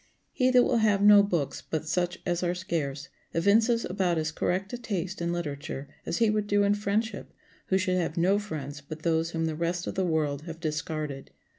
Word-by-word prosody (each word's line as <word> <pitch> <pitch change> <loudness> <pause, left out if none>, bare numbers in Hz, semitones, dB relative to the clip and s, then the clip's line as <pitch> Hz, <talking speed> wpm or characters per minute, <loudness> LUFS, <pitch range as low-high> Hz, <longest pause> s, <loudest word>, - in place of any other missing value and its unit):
He 255 -1 +2
that 250 -1 +6
will 245 - +2
have 210 -3 +3
no 205 0 +9
books 175 -8 -1
but 160 0 -4
such 175 +1 0
as 175 -1 0
are 175 0 0
scarce 150 -6 -3 0.3
evinces 225 +7 +3
about 180 -2 0
as 160 0 -1
correct 190 +5 -1
a - - -2
taste 190 -5 -3
in 170 0 0
literature 145 -4 -4 0.2
as - - -1
he 225 -2 +3
would 210 -1 0
do 205 0 +3
in 200 0 +3
friendship 205 +1 -2 0.4
who 190 - +3
should 185 -1 +1
have 170 -2 -2
no 190 +4 +3
friends 145 -8 -6
but 155 +2 -9
those 165 -1 +1
whom 165 -1 -1
the 160 - -1
rest 170 +2 -2
of - - -3
the 190 - 0
world 155 -5 0
have 165 -1 -7
discarded. 150 -3 -4
175 Hz, 205 wpm, -28 LUFS, 160-200 Hz, 0.4 s, no